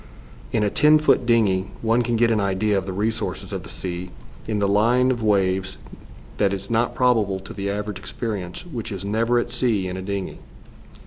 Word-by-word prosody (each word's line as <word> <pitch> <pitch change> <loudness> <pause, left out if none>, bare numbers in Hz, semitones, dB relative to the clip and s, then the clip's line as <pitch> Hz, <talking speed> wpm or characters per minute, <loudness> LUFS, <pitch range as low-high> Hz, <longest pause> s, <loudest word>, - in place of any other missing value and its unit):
In 110 - +1
a 105 - +1
ten 150 +1 +5
foot 150 -5 +2
dingey 100 -5 +3 0.2
one 115 +2 +3
can 120 0 0
get 115 0 +3
an 110 - +2
idea 100 +1 +1
of 95 -1 -1
the - - -2
resources 110 +3 -3
of - - -3
the - - -11
sea 90 0 -5 0.4
in 110 -1 -1
the 100 -1 +1
line 120 +6 +3
of 120 -2 -2
waves 95 -2 +1 0.6
that 100 -1 +2
is 100 +3 -5
not 115 +1 +1
probable 110 -7 +2
to 95 - -9
the 100 0 -3
average 105 -1 -3
experience 100 - -5
which 120 -11 -6
is 100 -1 -5
never 115 +4 +1
at 120 - -1
sea 110 -7 +1
in 90 0 -4
a - - -4
dingey. 100 0 -4
105 Hz, 200 wpm, -23 LUFS, 95-115 Hz, 0.6 s, ten